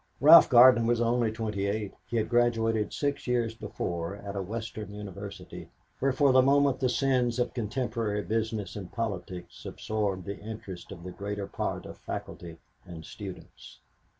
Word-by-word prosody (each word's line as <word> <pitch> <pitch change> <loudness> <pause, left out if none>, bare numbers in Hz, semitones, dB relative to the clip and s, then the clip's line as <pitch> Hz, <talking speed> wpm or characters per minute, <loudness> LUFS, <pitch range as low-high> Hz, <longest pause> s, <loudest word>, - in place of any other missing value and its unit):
Ralph 155 +4 +9
Gardner 120 -1 +8
was 120 0 +2
only 120 -1 +2
28. 105 -2 -2
He 120 - -2
had 110 - 0
graduated 115 -2 +1
six 145 -2 -2
years 120 -2 +1
before 90 -5 -4
at 100 0 -8
a 100 - -1
Western 110 +1 -6
university 100 -1 -8 0.3
where 135 +1 +2
for 140 0 +3
the 130 0 +6
moment 140 0 +3
the 130 - +1
sins 125 -1 +1
of 125 0 -1
contemporary 115 -3 -2
business 110 -1 -2
and 100 -4 -7
politics 95 -5 -5
absorbed 100 -4 -3
the 100 +2 -6
interest 100 -4 -8
of 85 -3 -9
the 90 - -6
greater 100 +1 -4
part 100 - -4
of - - -10
faculty 85 -2 -7 0.3
and 80 -2 -10
students. 95 -4 -10
110 Hz, 155 wpm, -28 LUFS, 100-120 Hz, 0.3 s, Ralph